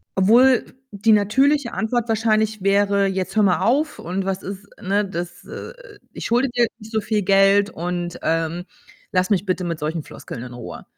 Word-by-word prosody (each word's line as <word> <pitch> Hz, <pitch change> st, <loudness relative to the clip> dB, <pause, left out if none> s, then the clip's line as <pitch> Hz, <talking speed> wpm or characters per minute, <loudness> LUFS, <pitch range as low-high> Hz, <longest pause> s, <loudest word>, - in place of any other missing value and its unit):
obwohl 235 Hz, +6 st, +5 dB, 0.3 s
die 210 Hz, +2 st, +3 dB
natürliche 260 Hz, +6 st, +2 dB
Antwort 235 Hz, +1 st, -1 dB
wahrscheinlich 220 Hz, -1 st, +1 dB
wäre: 200 Hz, 0 st, +3 dB
„Jetzt 190 Hz, +1 st, -3 dB
hör 210 Hz, -, +5 dB
mal 185 Hz, -3 st, +3 dB
auf.“ 295 Hz, +6 st, +1 dB
Und 190 Hz, +3 st, -3 dB
„Was 190 Hz, -1 st, -3 dB
ist“ 200 Hz, +1 st, -7 dB
ne? 200 Hz, +2 st, +1 dB
„Das 175 Hz, -2 st, -6 dB
äh, -, -, -8 dB
äh, -, -, -16 dB
ich -, -, -7 dB
schulde 245 Hz, +3 st, +2 dB
dir 240 Hz, -1 st, +2 dB
nicht 215 Hz, +1 st, -12 dB
so 220 Hz, -, +1 dB
viel 210 Hz, 0 st, 0 dB
Geld 195 Hz, +1 st, +4 dB
und, 175 Hz, 0 st, -4 dB
ähm, 165 Hz, +2 st, -1 dB, 0.5 s
lass 185 Hz, +1 st, +1 dB
mich 200 Hz, 0 st, +2 dB
bitte 185 Hz, -1 st, -1 dB
mit 165 Hz, -2 st, -3 dB
solchen 155 Hz, +1 st, -3 dB
Floskeln 120 Hz, -, -9 dB
in 125 Hz, -1 st, -9 dB
Ruhe.“ 120 Hz, -1 st, -9 dB
200 Hz, 185 wpm, -21 LUFS, 185-220 Hz, 0.5 s, obwohl